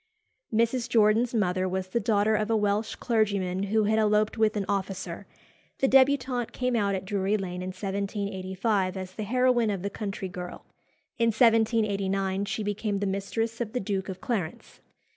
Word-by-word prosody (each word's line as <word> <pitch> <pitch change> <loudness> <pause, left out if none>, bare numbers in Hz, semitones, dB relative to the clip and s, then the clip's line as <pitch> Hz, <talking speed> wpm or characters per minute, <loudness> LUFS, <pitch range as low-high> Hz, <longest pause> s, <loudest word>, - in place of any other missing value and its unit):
Mrs. 235 +2 +1
Jordan's 225 +1 +3
mother 185 -3 +1
was 185 0 -3
the 235 - 0
daughter 215 -1 +2
of 215 0 0
a 225 - +3
Welsh 210 +1 0
clergyman 200 -6 0
who 215 +2 +2
had 220 +1 +2
eloped 210 0 +2
with 220 -1 +2
an 200 - -1
officer. 190 -2 -3 0.5
The 270 -7 +2
débutante 260 -2 +3
came 250 -1 -1
out 200 -3 +1
at 190 - -4
Drury 200 +1 0
Lane 180 -2 -5
in 185 - -4
1785 195 0 -2
as 185 -1 -6
the 215 - -6
heroine 245 +1 +2
of 195 -3 -2
"The 200 - -2
Country 200 -2 -4
Girl." 180 0 -8 0.5
In 230 - +3
1789 210 -4 +2
she 205 +2 -3
became 205 0 -2
the 200 - -1
mistress 220 +4 -2
of 225 -1 -3
the 250 - 0
Duke 195 -1 -3
of 185 -1 -6
Clarence. 200 -10 -4
205 Hz, 170 wpm, -27 LUFS, 190-225 Hz, 0.5 s, Jordan's